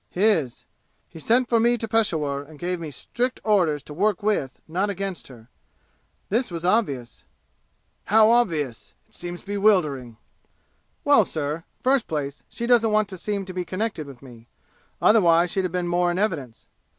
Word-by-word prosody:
"His. 180 - +1 0.4
He 165 - -11
sent 240 - +2
for 235 -1 +3
me 240 +1 +3
to 225 - -4
Peshawur 160 -11 0
and 150 +1 -14
gave 180 +2 -3
me 165 -2 -6
strict 245 - -3
orders 175 -9 +2
to 150 - -10
work 200 +4 0
with, 205 -11 -1
not 185 +6 -1
against 195 -2 -4
her. 115 -4 -14 0.8
This 235 +5 0
was 170 -1 -5
obvious." 145 - 0 0.8
"How 220 +2 +5
obvious? 160 - 0
It - - -24
seems 175 0 -6
bewildering!" 180 - +1 0.9
"Well, 285 -7 +5
sir, 155 -1 -4 0.2
first 265 -1 +2
place, 145 -2 -4
she 235 - -4
doesn't 235 -2 +4
want 215 -1 +2
to 190 - -7
seem 200 +1 -2
to 185 - -8
be 180 0 -2
connected 185 -4 -3
with 135 -2 -12
me. 120 -3 -14 0.5
Otherwise 175 -5 +4
she'd 190 -1 0
have 180 - -3
been 180 0 -2
more 175 0 +2
in 175 - -1
evidence. 160 - -2
180 Hz, 165 wpm, -24 LUFS, 150-215 Hz, 0.9 s, How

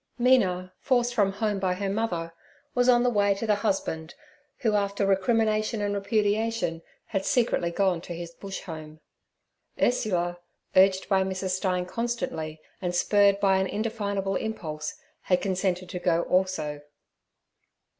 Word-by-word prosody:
Mina, 185 -8 +3
forced 245 -2 +1
from 200 -4 +2
home 210 -1 -1
by 185 -1 0
her 200 +1 -2
mother, 185 -5 -2 0.4
was 245 0 +3
on 240 -1 +5
the 250 - +3
way 205 -2 +3
to 200 - -4
the 215 - +3
husband, 195 -6 -2 0.5
who, 225 -4 +2
after 200 -1 +1
recrimination 215 +2 +2
and 205 0 -1
repudiation, 205 -3 0 0.2
had 195 -3 -2
secretly 225 -8 +1
gone 180 -1 +1
to 175 - -7
his 170 0 -6
Bush 195 +2 -7
home. 155 -3 -9 0.8
Ursula, 175 -7 +1 0.4
urged 190 0 +5
by 195 -1 +3
Mrs. 190 0 -2
Stein 185 -1 0
constantly, 180 -8 -3 0.2
and 180 -1 -2
spurred 200 +2 +4
by 195 -1 +4
an 190 0 +1
indefinable 200 -2 -2
impulse, 155 -8 -4 0.3
had 180 -1 +3
consented 185 -1 -1
to 180 - -4
go 170 -1 +2
also. 170 -6 0
195 Hz, 145 wpm, -27 LUFS, 180-215 Hz, 0.8 s, on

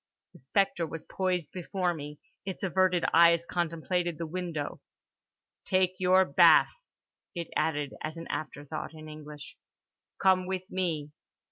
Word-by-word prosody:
The - - -16
spectre 175 +4 +1
was 165 0 -8
poised 180 -3 -2
before 180 0 -1
me; 150 -2 -8 0.3
its 190 0 -6
averted 185 -1 +2
eyes 170 0 +6
contemplated 175 0 -1
the 170 - -3
window. 165 -3 -4 0.8
"Take 185 0 +1
your 185 +1 +5
bath," - - +6 0.6
it 170 -1 -4
added 145 -3 0
as 155 +2 -5
an 165 - -7
afterthought, 145 +1 -5
in 155 0 -10
English—"Come 155 +4 -3
with 185 -1 -2
me." 165 -6 -2
170 Hz, 125 wpm, -29 LUFS, 155-185 Hz, 0.8 s, eyes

